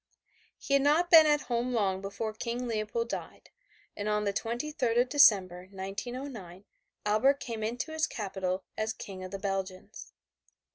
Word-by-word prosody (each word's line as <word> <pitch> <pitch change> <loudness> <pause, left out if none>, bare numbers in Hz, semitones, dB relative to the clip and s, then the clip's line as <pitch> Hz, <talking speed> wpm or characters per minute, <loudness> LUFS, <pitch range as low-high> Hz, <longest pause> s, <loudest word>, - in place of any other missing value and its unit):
He 275 - -3
had 275 - +5
not 310 +5 +3
been 320 -2 +9
at 295 -1 +3
home 245 0 -2
long 195 -4 0
before 200 +3 -4
King 235 +3 -4
Leopold 225 +1 -2
died, - - -7 0.4
and 205 +1 -3
on 210 0 +1
the 200 -1 0
23rd 240 +2 -1
of 250 +1 +2
December, 190 -10 +4
1909, 200 0 -7 0.4
Albert 245 +7 +3
came 225 -3 -5
into 245 +8 -3
his 315 -1 0
capital 190 -3 -3
as 220 0 -2
King 190 -4 -8
of 185 - -6
the 195 - -5
Belgians. 195 -1 -5
220 Hz, 155 wpm, -30 LUFS, 195-250 Hz, 0.4 s, been